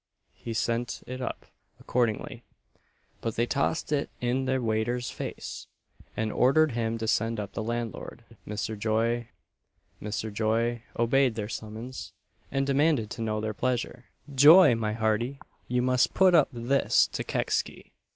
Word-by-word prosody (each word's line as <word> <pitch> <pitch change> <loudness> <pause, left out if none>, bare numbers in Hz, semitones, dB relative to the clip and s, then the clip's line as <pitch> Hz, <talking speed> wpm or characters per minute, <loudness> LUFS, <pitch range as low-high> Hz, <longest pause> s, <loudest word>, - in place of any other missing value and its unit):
He 115 -1 -7
sent 120 +2 -1
it 130 +1 -6
up 125 - -5 0.3
accordingly; 120 -4 -1 0.8
but 115 - -3
they 120 - +2
tossed 140 +5 -1
it 145 -1 0
in 125 +2 0
the 130 0 +1
waiter's 120 +1 -1
face, - - -6 0.5
and 110 -1 -1
ordered 145 +6 +4
him 115 -1 -1
to 110 0 -4
send 115 0 +1
up 105 - -5
the - - -3
landlord, 115 0 -4 0.2
Mr. 105 +1 -3
Joy. 115 +2 0 0.7
Mr. 105 +1 -4
Joy 115 +2 0 0.2
obeyed 120 +1 +3
their 105 -2 -3
summons, 110 +3 -7 0.4
and 135 0 0
demanded 140 -5 +2
to - - -6
know 110 -1 -1
their 110 0 -3
pleasure. 125 +1 -2 0.3
"Joy, 150 +2 +8
my 110 -2 -1
hearty! 115 +4 0 0.3
you 125 0 0
must 125 0 +2
put 190 -1 +5
up 155 -5 +5
this 125 +3 +2
to - - -4
Kecksy. - - -2
120 Hz, 145 wpm, -28 LUFS, 110-130 Hz, 0.8 s, Joy